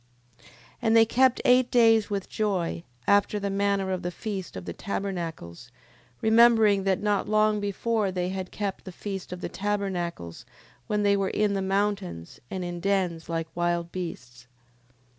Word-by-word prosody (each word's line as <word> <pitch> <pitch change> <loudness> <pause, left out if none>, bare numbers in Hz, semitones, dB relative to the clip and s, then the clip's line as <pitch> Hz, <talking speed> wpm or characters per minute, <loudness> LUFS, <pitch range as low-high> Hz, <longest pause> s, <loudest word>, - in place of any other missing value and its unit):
10:6. - - -24 0.4
And 225 -1 +4
they 225 - +7
kept 255 +2 +3
eight 250 0 +5
days 225 -3 +4
with 200 -2 -3
joy, 185 -6 -2 0.2
after 205 +1 +3
the 200 -1 -2
manner 200 -1 0
of 185 -1 -2
the 175 - -2
feast 190 - -6
of 90 - -7
the 85 - -5
tabernacles, 170 - -5 0.5
remembering 220 -3 +5
that 195 0 +1
not 205 -1 0
long 215 0 +3
before 205 0 -1
they 180 -1 -2
had 190 -1 -4
kept 200 -2 -4
the 190 - -7
feast 195 0 -6
of 180 0 -6
the - - -3
tabernacles 185 - -3 0.4
when 210 0 0
they 200 0 +4
were 195 -1 0
in 210 -1 +1
the 195 - -1
mountains, 195 - -2
and 185 -1 -4
in 175 0 -5
dens 180 -3 -1
like 165 -1 -2
wild 175 0 -1
beasts. 125 -9 -7
195 Hz, 165 wpm, -26 LUFS, 175-210 Hz, 0.5 s, they